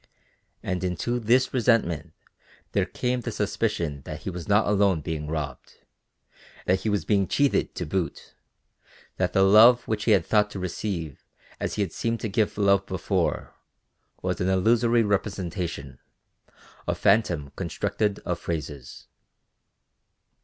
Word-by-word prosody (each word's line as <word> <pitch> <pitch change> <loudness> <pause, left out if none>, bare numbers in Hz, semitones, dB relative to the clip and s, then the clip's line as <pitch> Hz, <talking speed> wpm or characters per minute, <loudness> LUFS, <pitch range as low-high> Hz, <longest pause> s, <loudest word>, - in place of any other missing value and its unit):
And 90 -1 -2
into 90 +7 -1
this 125 +3 +2
resentment 115 - +1 0.6
there - - +1
came 125 0 -2
the - - -4
suspicion 75 -5 -2
that - - -7
he - - -4
was 90 -1 -7
not 105 +1 +4
alone 100 -5 +2
being 75 -1 -4
robbed, 75 -4 -5 0.9
that 95 +1 +2
he 110 - -2
was 105 -1 0
being 100 -3 +2
cheated 140 -1 +1
to 90 - -3
boot, 80 -1 -3 0.8
that - - 0
the 95 - +4
love 115 +5 +7
which 110 -1 -2
he 115 - +3
had 95 -5 +3
thought 105 -1 +3
to 100 - -7
receive 90 -4 -4 0.4
as - - -3
he 105 - +1
had 95 - -5
seemed 115 0 -2
to 110 - -2
give 105 +1 0
love 100 -1 +3
before, 95 -4 -1 0.7
was - - -2
an 90 - +1
illusory 115 +5 +3
representation, 90 - -3 0.9
a - - 0
phantom 85 -9 +2
constructed 105 -2 -1
of - - -2
phrases. 75 -6 -6
95 Hz, 140 wpm, -26 LUFS, 85-110 Hz, 0.9 s, love